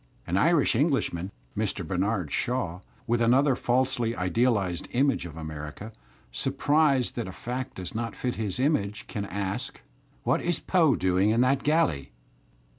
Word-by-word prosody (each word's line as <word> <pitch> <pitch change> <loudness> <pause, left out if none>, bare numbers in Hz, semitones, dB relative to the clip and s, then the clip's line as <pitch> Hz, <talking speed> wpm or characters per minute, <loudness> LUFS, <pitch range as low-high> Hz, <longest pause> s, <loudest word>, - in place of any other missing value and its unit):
An 90 - -2
Irish 150 - +3
Englishman, 120 - +1 0.3
Mr. - - -2
Bernard 95 -3 -1
Shaw, 120 -9 -1 0.3
with 120 0 +1
another 130 +4 +4
falsely 120 -2 +1
idealized 95 -2 0
image 130 -7 +2
of 80 -2 -11
America, 80 +7 -7 0.4
surprised 140 - +2
that 120 -4 -3
a - - -5
fact 125 +6 -5
does 90 -1 -6
not 115 0 -3
fit 125 -1 -2
his 105 -3 -3
image^ 105 -7 0
can 100 -1 -4
ask: 100 0 -4 0.4
"What - - +1
is 175 -2 0
Poe 160 -8 +3
doing 95 +2 +2
in 115 +2 +3
that 130 +2 +3
galley?" 145 - +1
115 Hz, 145 wpm, -27 LUFS, 95-135 Hz, 0.4 s, another